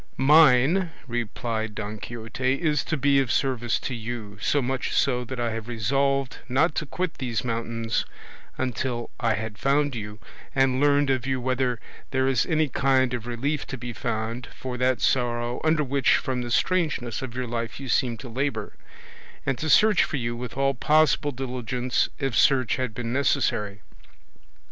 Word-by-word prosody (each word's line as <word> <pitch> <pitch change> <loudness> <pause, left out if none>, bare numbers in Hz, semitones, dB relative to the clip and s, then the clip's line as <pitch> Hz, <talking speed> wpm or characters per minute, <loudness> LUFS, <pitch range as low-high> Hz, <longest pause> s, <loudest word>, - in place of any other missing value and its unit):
"Mine," 150 +5 +5 0.2
replied 115 -2 -3
Don 105 0 -5
Quixote, 120 +4 -2
"is 150 -1 0
to 155 - -1
be 140 0 +3
of 135 -4 0
service 125 -4 +1
to 130 - -3
you, 110 -3 -6
so 145 - +2
much 130 0 -2
so 125 -2 +2
that 125 +1 -6
I 120 -1 0
had 115 0 -5
resolved 135 +3 0
not 140 +7 +3
to 155 - -3
quit 180 +3 -3
these 120 -4 -2
mountains 115 -1 -1 0.5
until 125 -1 -2
I 115 -2 +2
had 110 -1 -5
found 145 +1 +2
you, 105 -3 -6 0.4
and 135 -1 +3
learned 145 -1 +4
of 130 -1 -1
you 130 -1 0
whether 125 -1 0 0.3
there 130 -1 +1
is 135 -3 +2
any 155 -2 +2
kind 130 -1 +2
of 120 -1 -4
relief 135 +5 -2
to 135 - -5
be 120 0 -6
found 110 +3 -3
for 130 -1 -5
that 125 -1 +1
sorrow 120 -1 0
under 155 -1 +3
which 135 -1 +3
from 130 -1 -1
the 120 - -4
strangeness 145 -6 0
of 125 -2 -6
your 130 0 -2
life 115 0 -4
you 135 - -7
seem 120 -1 +1
to 120 - -9
labour; 120 -3 -2 0.7
and 135 -3 -1
to 155 - -2
search 210 +6 +6
for 150 - -2
you 120 -2 -2
with 120 +1 -7
all 135 0 +2
possible 150 +2 +3
diligence, 125 -1 -1
if 135 -4 -2
search 130 -5 +3
had 125 -4 -3
been 120 -1 -3
necessary. 105 -6 0
125 Hz, 170 wpm, -25 LUFS, 120-135 Hz, 0.7 s, search